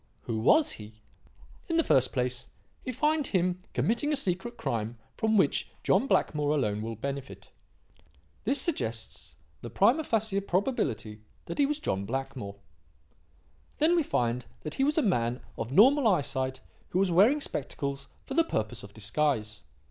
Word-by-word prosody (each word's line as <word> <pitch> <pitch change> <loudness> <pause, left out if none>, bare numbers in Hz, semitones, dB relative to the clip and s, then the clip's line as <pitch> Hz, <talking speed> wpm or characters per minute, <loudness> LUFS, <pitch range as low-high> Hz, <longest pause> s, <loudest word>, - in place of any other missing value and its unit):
Who 110 -1 -3
was 295 - +4
he? 105 0 -10 0.7
"In 330 - 0
the 330 - +4
first 130 - +3
place, 125 -1 -1 0.4
we 255 - -3
find 300 +3 +1
him 180 -1 0 0.2
committing 240 +7 +1
a - - +2
secret 235 -1 -2
crime 115 +1 -3 0.2
from 220 -1 +2
which 190 - +2
John 275 - +3
Blackmore 150 - +1
alone 105 -7 0
will 115 +1 -4
benefit. 140 +4 -6 0.9
This 280 - +1
suggests 110 - -2 0.3
the 120 - -6
prima 235 - +3
facie 220 -6 0
probability 140 - -1 0.2
that - - -6
he 280 - +5
was 300 +1 -2
John 100 - -2
Blackmore. 130 -4 -4 1.2
"Then 325 +3 +4
we 340 - +4
find 120 - -1
that 155 - -6
he 270 - 0
was 295 +3 +2
a 315 - +4
man 120 - +1 0.2
of 115 - -5
normal 255 - +6
eyesight 135 -7 0 0.3
who - - -2
was 190 -1 +2
wearing 215 - +5
spectacles 140 - -4 0.2
for 270 - -6
the 330 +4 +4
purpose 110 - -3
of 100 0 -12
disguise. 110 -1 -1
150 Hz, 155 wpm, -29 LUFS, -, 1.2 s, normal